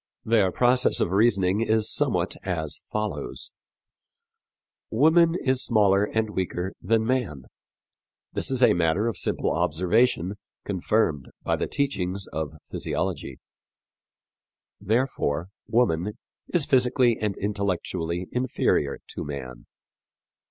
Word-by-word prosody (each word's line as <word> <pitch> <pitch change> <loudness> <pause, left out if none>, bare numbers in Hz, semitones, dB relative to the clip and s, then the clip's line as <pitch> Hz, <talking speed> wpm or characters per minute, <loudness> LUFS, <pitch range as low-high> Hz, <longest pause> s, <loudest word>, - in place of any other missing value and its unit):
Their 110 -5 +3
process 125 +3 +3
of - - 0
reasoning 100 -1 +3
is 110 -1 +2
somewhat - - +1
as 80 -5 -3
follows: 105 0 -3 1.4
"Woman 165 +7 +4
is 130 -1 +1
smaller 105 -4 +4
and 110 0 -1
weaker 95 -1 -3
than 110 +3 +1
man. 115 - -1 0.9
This - - -2
is 130 -1 +1
a - - +6
matter 85 +5 +1
of 115 - -1
simple - - -1
observation, 100 +3 +1 0.3
confirmed 95 -6 0 0.2
by - - +1
the - - -2
teachings 100 -9 -2
of 80 -1 -3 0.2
physiology. - - -3 1.4
Therefore, 100 - 0 0.2
woman 105 -4 +1 0.3
is 170 -5 +2
physically 125 -3 +3
and 105 -2 -2
intellectually 90 -4 -2
inferior 125 - 0
to - - -5
man. 65 -4 -7
105 Hz, 110 wpm, -25 LUFS, 90-120 Hz, 1.4 s, a